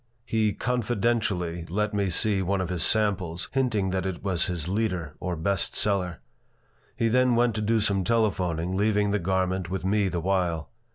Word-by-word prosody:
He 110 Hz, -2 st, +1 dB
"confidentially" 105 Hz, -8 st, -1 dB
let 105 Hz, +4 st, -1 dB
me 100 Hz, -2 st, 0 dB
see 100 Hz, +3 st, +2 dB
one 95 Hz, +1 st, 0 dB
of 95 Hz, -2 st, -2 dB
his 90 Hz, -3 st, -2 dB
samples, 95 Hz, -5 st, +1 dB
hinting 115 Hz, -8 st, 0 dB
that 95 Hz, 0 st, -1 dB
it 95 Hz, -3 st, -5 dB
was 95 Hz, -5 st, +1 dB
his 85 Hz, -4 st, -3 dB
"leader," 90 Hz, -7 st, -1 dB
or 90 Hz, -1 st, -3 dB
best 95 Hz, +3 st, -1 dB
seller. 95 Hz, -4 st, 0 dB, 0.7 s
He 115 Hz, -, +1 dB
then 125 Hz, +1 st, +3 dB
went 120 Hz, 0 st, +3 dB
to 110 Hz, -, -2 dB
do 110 Hz, +2 st, +2 dB
some 100 Hz, -2 st, +1 dB
telephoning, 90 Hz, -5 st, 0 dB
leaving 105 Hz, 0 st, +2 dB
the 105 Hz, -, +1 dB
garment 95 Hz, 0 st, -1 dB
with 95 Hz, 0 st, -3 dB
me 100 Hz, +1 st, +2 dB
the 90 Hz, -, -2 dB
while. 85 Hz, -3 st, -1 dB
95 Hz, 175 wpm, -26 LUFS, 90-110 Hz, 0.7 s, then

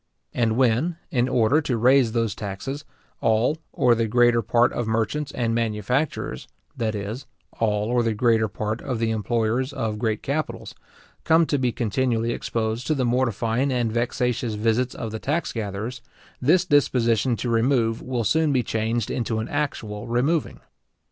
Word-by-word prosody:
And 115 Hz, -2 st, +1 dB
when, 130 Hz, +7 st, +2 dB
in 125 Hz, -3 st, +1 dB
order 125 Hz, +6 st, +3 dB
to 125 Hz, -5 st, -1 dB
raise 125 Hz, 0 st, +4 dB
those 115 Hz, -3 st, 0 dB
taxes, 110 Hz, +9 st, -6 dB, 0.3 s
all 115 Hz, +8 st, +2 dB
or 125 Hz, -1 st, +3 dB
the 115 Hz, -1 st, 0 dB
greater 120 Hz, +1 st, +4 dB
part 120 Hz, +3 st, +2 dB
of 120 Hz, -, -2 dB
merchants 115 Hz, +7 st, -1 dB
and 115 Hz, -4 st, -1 dB
manufacturers, 115 Hz, -, -1 dB, 0.3 s
that 110 Hz, -2 st, -2 dB
is, 105 Hz, +6 st, -5 dB, 0.3 s
all 105 Hz, -2 st, +1 dB
or 120 Hz, 0 st, +3 dB
the 115 Hz, -2 st, 0 dB
greater 110 Hz, -1 st, +3 dB
part 110 Hz, +2 st, -3 dB
of 130 Hz, -4 st, -3 dB
the 115 Hz, 0 st, 0 dB
employers 115 Hz, +4 st, 0 dB
of 110 Hz, -6 st, -3 dB
great 110 Hz, -2 st, -1 dB
capitals, 150 Hz, +2 st, -3 dB, 0.5 s
come 165 Hz, +1 st, +4 dB
to 145 Hz, -2 st, 0 dB
be 125 Hz, -2 st, +1 dB
continually 120 Hz, 0 st, 0 dB
exposed 115 Hz, 0 st, -2 dB
to 155 Hz, -, +2 dB
the 130 Hz, -3 st, 0 dB
mortifying 120 Hz, +1 st, +1 dB
and 120 Hz, -3 st, 0 dB
vexatious 120 Hz, -1 st, -1 dB
visits 115 Hz, +4 st, 0 dB
of 115 Hz, -, -5 dB
the 110 Hz, -, -5 dB
tax 155 Hz, +7 st, -1 dB
gatherers, 110 Hz, +3 st, -4 dB, 0.4 s
this 170 Hz, +8 st, +4 dB
disposition 125 Hz, -, +2 dB
to 120 Hz, -, -4 dB
remove 115 Hz, -1 st, +1 dB
will 125 Hz, -2 st, -2 dB
soon 155 Hz, +8 st, +2 dB
be 130 Hz, -3 st, +2 dB
changed 115 Hz, +1 st, -1 dB
into 115 Hz, -2 st, -1 dB
an 110 Hz, -, -2 dB
actual 115 Hz, -7 st, -3 dB
removing. 135 Hz, +7 st, 0 dB
120 Hz, 160 wpm, -24 LUFS, 110-130 Hz, 0.5 s, raise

